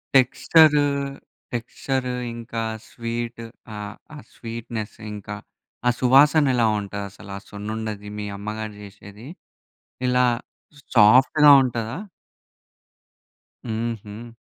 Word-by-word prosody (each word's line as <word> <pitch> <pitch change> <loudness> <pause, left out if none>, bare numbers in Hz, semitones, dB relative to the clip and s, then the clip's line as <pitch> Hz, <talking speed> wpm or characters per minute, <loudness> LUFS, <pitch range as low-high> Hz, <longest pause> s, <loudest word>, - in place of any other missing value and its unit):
Texture 145 +3 +5 0.7
texture 125 +2 -2 0.2
ఇంకా 115 0 -5 0.3
sweet 115 0 -4 0.3
ఆహ్, 105 +1 -6 0.2
ఆ - - -8 0.2
స్వీట్‌‌నెస్ 115 -2 -6 0.2
ఇంకా 105 0 -7 0.5
ఆ - - +6
సువాసన 145 +4 +6
ఎలా 120 -2 +3
ఉంటది? 100 0 -5
అసలు 100 0 -12
ఆ - - -7
సున్నుండది 105 0 -5
మీ 105 - -4
అమ్మగారు 110 +1 -5
జేసేది 105 +3 -12 0.8
ఇలా 125 0 +3 0.7
సాఫ్ట్‌గా 130 +7 +7
ఉంటదా? 115 0 -3 1.7
హుహు. 115 0 -5
115 Hz, 90 wpm, -23 LUFS, 105-125 Hz, 1.7 s, సాఫ్ట్‌గా